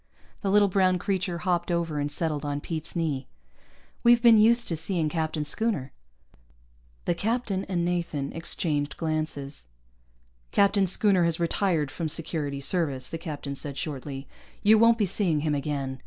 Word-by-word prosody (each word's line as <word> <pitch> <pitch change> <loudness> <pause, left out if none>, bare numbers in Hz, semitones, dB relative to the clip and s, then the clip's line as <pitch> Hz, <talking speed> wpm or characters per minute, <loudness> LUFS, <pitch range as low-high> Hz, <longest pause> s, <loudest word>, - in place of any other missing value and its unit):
The 200 - -1
little 205 +1 +5
brown 185 -1 +2
creature 185 -1 -2
hopped 175 0 -1
over 170 -3 -1
and 145 0 -2
settled 155 -3 -1
on 145 0 -2
Pete's 160 +2 -6
knee. 150 -6 -2 0.8
"We've 240 0 +6
been 230 -2 +7
used 235 +2 +4
to 165 - -1
seeing 160 0 -1
Captain 155 -1 -2
Schooner." 150 - -1 1.1
The - - +2
captain 205 0 -1
and 175 -2 -1
Nathan 170 -5 -2
exchanged 150 -3 -2
glances. 155 - -3 0.8
"Captain 200 -1 +3
Schooner 190 -1 +3
has 170 0 +1
retired 170 -4 0
from 165 -3 -3
Security 150 -3 -2
Service," 140 -5 0
the 165 - -5
captain 150 -4 -5
said 140 0 -1
shortly. 135 -1 -5 0.4
"You 215 +1 +6
won't 230 +1 +5
be 215 - +2
seeing 175 -5 0
him 150 -1 0
again. 140 -2 -3
165 Hz, 155 wpm, -26 LUFS, 145-190 Hz, 1.1 s, been